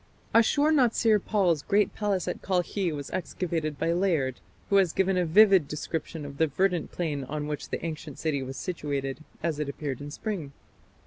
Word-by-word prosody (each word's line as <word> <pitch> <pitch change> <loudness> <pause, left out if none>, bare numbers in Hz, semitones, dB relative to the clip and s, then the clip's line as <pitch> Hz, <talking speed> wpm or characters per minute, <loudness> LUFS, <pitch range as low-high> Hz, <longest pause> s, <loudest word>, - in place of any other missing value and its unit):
Ashur 285 +7 +4
natsir 230 -6 +4
pal's 180 -8 +2
great 205 +3 +2
palace 205 -3 -1
at - - -3
Kalkhi 185 0 0
was 145 -2 -6
excavated 165 -4 -2
by 165 +4 +1
Layard, 165 -9 +1 0.3
who 200 - +6
has 185 -4 +3
given 190 0 +2
a 180 -2 +1
vivid 190 -2 +6
description 155 +1 -4
of 140 -1 -8
the 160 - +4
verdant 180 +3 0
plain 150 -5 -2
on 150 +2 -4
which 150 -1 -5
the - - -3
ancient 155 -3 -6
city 150 -4 -1
was 135 0 -6
situated, 140 -1 -3 0.2
as 160 -3 -1
it 150 -2 -2
appeared 140 -2 -4
in 145 - -6
spring. 160 -4 -4
165 Hz, 180 wpm, -27 LUFS, 145-195 Hz, 0.3 s, who